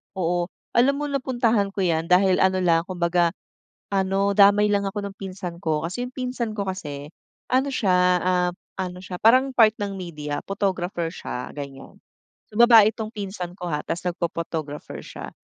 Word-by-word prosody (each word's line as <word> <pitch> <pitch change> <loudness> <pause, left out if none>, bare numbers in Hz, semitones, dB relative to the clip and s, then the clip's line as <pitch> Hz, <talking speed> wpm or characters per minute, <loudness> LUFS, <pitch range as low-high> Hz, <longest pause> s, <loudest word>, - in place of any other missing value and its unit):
Oo, 175 -1 0 0.2
alam 260 +4 +3
mo, 295 +1 -3
napuntahan 240 -7 0
ko 195 - -1
yan 165 -2 0
dahil 185 +1 +4
ano 190 0 +3
lang 165 -1 +3
kumbaga, 175 -1 +1 0.6
ano, 195 +1 +1
damay 205 +1 +6
lang 200 -1 +1
ako 205 +1 -4
ng 200 -1 -7
pinsan 185 -3 -7
ko. 155 -4 -1
Kasi 245 +8 -4
yung 250 - -14
pinsan 250 -3 -3
ko 205 - -2
kasi 150 -6 -5 0.4
ano 260 +2 +3
siya, 200 -7 +1 0.3
ah, 180 -1 +2 0.3
ano 180 -1 -4
siya 180 -1 -6
parang 255 +4 +5
part 220 -3 +6
ng 200 -1 -3
media, 150 -5 -5
photographer 185 -4 -1
siya, 125 -6 -6
ganiyan. 140 -2 -9 0.5
So, - - -16
babae 230 -3 +8
itong 220 -1 -5
pinsan 190 -4 -5
ko 180 - -4
ha 150 0 -1
tapos 170 +1 -3
nagpho-photographer 165 -4 -4
siya. - - -9
190 Hz, 165 wpm, -24 LUFS, 170-210 Hz, 0.6 s, babae